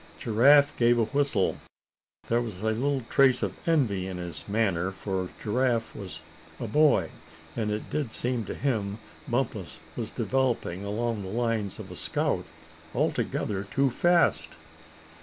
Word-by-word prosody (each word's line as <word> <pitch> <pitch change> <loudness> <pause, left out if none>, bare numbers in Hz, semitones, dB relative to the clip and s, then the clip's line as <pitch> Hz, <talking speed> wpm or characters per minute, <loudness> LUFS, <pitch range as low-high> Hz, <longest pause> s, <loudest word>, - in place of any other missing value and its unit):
Giraffe 140 +6 +5
gave 120 0 +4
a 115 - +4
whistle. 135 -5 +1 0.7
There 120 +1 +2
was 105 -6 -6
a 110 - +2
little 135 +3 0
trace 130 -3 +4
of 95 -2 -1 0.2
envy 110 - +2
in 95 -1 -5
his 85 -4 -5
manner, 100 -4 +1
for 95 -1 -3
Giraffe 120 +1 0
was 95 -6 -7 0.4
a - - -3
boy, 135 - +3 0.4
and 110 -2 -1
it 105 +1 -4
did 145 -7 -1
seem 120 0 -1
to - - -5
him 105 -7 -1 0.3
Bumpus 115 -9 -2 0.2
was 115 -3 -4
developing 115 -6 -1
along 110 +2 -2
the 95 - -6
lines 110 -1 -1
of - - -9
a - - -7
scout - - -1 0.5
altogether 100 -1 -1
too 135 +5 +1
fast. 175 +6 +3
115 Hz, 145 wpm, -27 LUFS, 100-130 Hz, 0.7 s, Giraffe